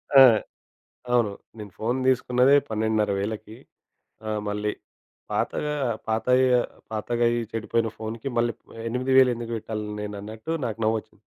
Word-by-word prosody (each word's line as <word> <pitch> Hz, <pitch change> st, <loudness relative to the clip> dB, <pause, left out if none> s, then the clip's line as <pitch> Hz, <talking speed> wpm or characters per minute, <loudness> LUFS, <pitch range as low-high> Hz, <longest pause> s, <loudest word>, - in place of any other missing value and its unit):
ఆ! 135 Hz, -, +11 dB, 0.9 s
అవును. 120 Hz, -4 st, +3 dB, 0.3 s
నేను 105 Hz, -3 st, -8 dB
ఫోను 120 Hz, +4 st, 0 dB
తీసుకున్నదే 130 Hz, +1 st, +4 dB
12500కి 110 Hz, 0 st, -1 dB, 0.7 s
ఆ! -, -, -1 dB, 0.2 s
మళ్ళీ 105 Hz, +1 st, -1 dB, 0.6 s
పాతగా 150 Hz, 0 st, -1 dB, 0.3 s
పాత 110 Hz, 0 st, 0 dB, 0.7 s
పాతగా 120 Hz, +2 st, -1 dB
అయ్యి 120 Hz, 0 st, 0 dB
చెడిపోయిన 115 Hz, 0 st, 0 dB
ఫోన్‌కి 110 Hz, +3 st, -5 dB
మళ్ళీ 120 Hz, 0 st, +2 dB, 0.3 s
8000 130 Hz, +2 st, +4 dB
ఎందుకు 115 Hz, 0 st, -6 dB
పెట్టాలి, 110 Hz, -1 st, -5 dB
నేను 105 Hz, 0 st, -5 dB
అన్నట్టు 110 Hz, +8 st, -7 dB
నాకు 115 Hz, -1 st, -4 dB
నవ్వొచ్చింది. 110 Hz, 0 st, -2 dB
110 Hz, 115 wpm, -25 LUFS, 110-120 Hz, 0.9 s, ఆ